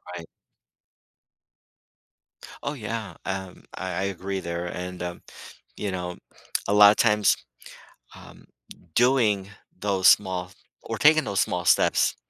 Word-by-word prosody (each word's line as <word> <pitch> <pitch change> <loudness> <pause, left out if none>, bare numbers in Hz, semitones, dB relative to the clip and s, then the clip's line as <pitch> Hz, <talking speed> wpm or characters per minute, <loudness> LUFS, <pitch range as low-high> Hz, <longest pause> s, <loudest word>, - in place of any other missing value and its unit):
Right. 85 -1 -8 2.4
Oh, 145 - -2
yeah, 110 - -6
um, 95 -1 -5
I 95 0 -5
I 95 - -2
agree 100 0 -3
there, 85 -1 -4
and, 90 0 -6
um, 90 0 -5 0.6
you 105 - -3
know, 90 -1 -5 0.5
a 100 - +2
lotta 105 0 +8
times, 105 -3 +3 0.8
um, - - -15 0.5
doing 115 -6 +2 0.3
those 95 -1 +2
small 90 -2 +2 0.3
or - - -5
taking 155 +1 +5
those 100 -2 -1
small 90 -1 -1
steps - - +3
95 Hz, 115 wpm, -25 LUFS, 90-105 Hz, 2.4 s, lotta